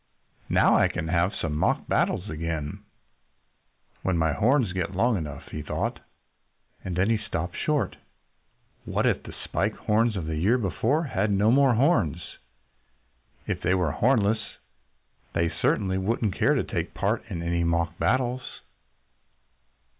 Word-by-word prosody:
"Now - - +4
I - - +4
can 80 -2 -4
have 85 +2 +2
some 80 -3 -3
mock 75 - +1
battles 95 - +1
again 80 -2 -4 1.2
when 95 -2 0
my 80 -2 +2
horns 120 - +2
get 95 0 -3
long 115 +4 +3
enough," 75 -6 -6
he 75 - -4
thought. - - -3 0.8
And 90 -2 -4
then 95 +5 +2
he 115 - +3
stopped 85 -4 -4
short. 145 -10 -1 0.9
What - - -1
if - - +2
the - - -11
Spike - - -1
Horns 110 +1 +1
of 90 -5 -3
the 80 -1 -3
year 105 +10 +3
before 115 - 0
had 105 - -1
no 105 +2 +3
more 135 -1 +5
horns? 115 - +1 1.1
If - - -3
they 90 - +2
were 90 -5 +1
hornless 110 - +2 0.9
they 85 0 +1
certainly 95 -1 +1
wouldn't 105 0 0
care - - +2
to - - +1
take - - -4
part 105 +3 0
in 85 -5 -4
any 85 0 0
mock 85 0 0
battles. 125 0 -1
95 Hz, 145 wpm, -26 LUFS, 85-115 Hz, 1.2 s, more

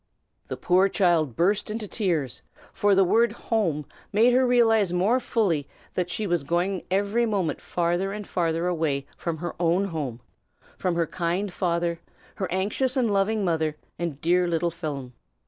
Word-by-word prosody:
The - - -5
poor 185 +2 +3
child 170 - +2
burst 200 +5 +1
into 215 0 -4
tears, 160 - -1 0.3
for 205 -1 +3
the 195 - +5
word 230 +6 +3
'home' 170 -10 -1 0.3
made 230 +4 +4
her 255 0 +4
realize 225 -6 +4
more 195 +8 +2
fully 180 - 0 0.3
that 180 -1 -1
she 210 +4 -2
was 175 -6 0
going 175 +5 0
every 205 +5 +1
moment 195 -7 -1
farther 175 +3 -1
and 210 0 -6
farther 165 -1 0
away 160 -6 0
from 170 -2 -3
her 175 +1 -4
own 175 +3 +2
home, 140 -8 -4 0.6
from 180 -2 -1
her 170 -1 +1
kind 175 +4 -2
father, 170 -2 -1 0.4
her 190 -3 -3
anxious 210 +8 0
and 235 -5 +2
loving 200 +1 +1
mother, 160 -3 0 0.2
and 170 -5 -3
dear 180 +2 +3
little 170 0 0
Phelim. 145 -7 -5
180 Hz, 165 wpm, -25 LUFS, 165-205 Hz, 0.6 s, the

